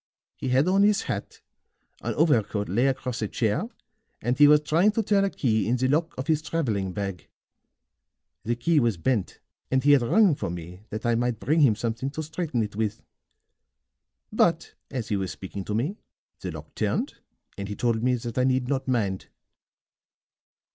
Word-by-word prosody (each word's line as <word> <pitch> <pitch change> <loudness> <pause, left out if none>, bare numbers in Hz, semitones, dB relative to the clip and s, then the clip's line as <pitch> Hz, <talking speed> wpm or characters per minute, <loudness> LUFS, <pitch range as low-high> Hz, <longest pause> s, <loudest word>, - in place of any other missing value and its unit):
He 130 - -4
had 130 +5 +3
on 195 +2 +4
his 210 0 +4
hat, - - -5 0.6
an - - -3
overcoat 110 -9 +2
lay 120 +8 +2
across 125 -3 -2
a 110 - 0
chair 110 - -1 0.5
and 120 +2 0
he 145 +2 +7
was 150 0 +6
trying 165 +7 +3
to 225 - 0
turn 200 -1 +3
a 195 - +2
key 110 - 0
in 120 - +2
the 130 +1 +1
lock 160 +5 0
of 130 - -3
his 155 0 +1
traveling 110 - -1
bag. 95 -1 -5 1.2
The 120 +2 0
key 150 +7 +2
was 115 -7 +1
bent 105 +1 -1 0.3
and 130 -1 +1
he 145 - +5
had 140 -3 +6
rung 190 - +4
for 140 - -3
me 90 +3 -8
that 110 +2 -5
I 120 - +3
might 120 -1 0
bring 155 +4 +1
him 130 -8 +5
something 115 +4 -2
to 155 +3 -5
straighten 155 -6 -2
it 105 -1 -6
with. 105 -1 -2 1.3
But - - +2 0.2
as 120 -5 -4
he 105 - +1
was 95 -1 -2
speaking 95 +1 -7
to 105 - -2
me, 145 - -1 0.4
the - - -5
lock - - -9
turned, - - -1 0.4
and 100 0 -5
he 105 - -5
told 115 -1 0
me 125 +1 +2
that 120 0 -4
I - - +3
need 130 -1 +1
not 135 0 -1
mind." 105 -7 -1
125 Hz, 190 wpm, -26 LUFS, 110-150 Hz, 1.3 s, he